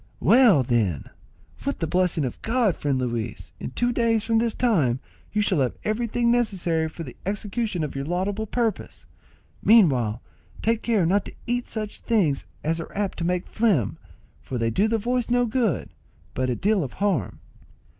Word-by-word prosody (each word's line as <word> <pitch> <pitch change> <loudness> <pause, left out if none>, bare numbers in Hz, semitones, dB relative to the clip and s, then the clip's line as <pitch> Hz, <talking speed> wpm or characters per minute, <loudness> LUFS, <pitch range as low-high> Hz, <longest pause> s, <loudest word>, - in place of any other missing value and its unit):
"Well, 230 - +6
then, 110 - 0 0.5
with 280 +1 -2
the 165 - -1
blessing 180 -2 +1
of 125 - -6
God, 225 -6 +1
friend 140 -2 -1
Luis, 120 -3 -3
in - - -5
two 245 0 0
days 230 -2 +2
from 225 -1 +2
this 230 -1 0
time 155 - +2 0.3
you 210 0 +1
shall 185 -5 +2
have 130 -3 0
everything 235 +2 0
necessary 180 -9 +1
for 165 +1 -8
the 130 - -9
execution 205 -1 -2
of 150 - -4
your 135 0 -3
laudable 195 +6 -2
purpose. 230 0 -2 0.6
Meanwhile, 130 - +4 0.4
take 230 0 +1
care 220 -7 +2
not 195 +4 +2
to - - -9
eat 245 +1 -1
such 215 -2 -4
things 180 - +1 0.2
as 165 +2 0
are 165 - -7
apt 200 -3 -2
to - - -2
make 180 +1 0
phlegm, 200 - +1 0.4
for 130 - -5
they 115 -1 0
do 200 - +2
the 225 +1 +1
voice 245 +3 -1
no 245 0 +3
good, 220 - 0 0.4
but 130 0 -1
a 125 - 0
deal 200 - +1
of 130 - -6
harm." 185 - -1
195 Hz, 175 wpm, -24 LUFS, 145-230 Hz, 0.6 s, Well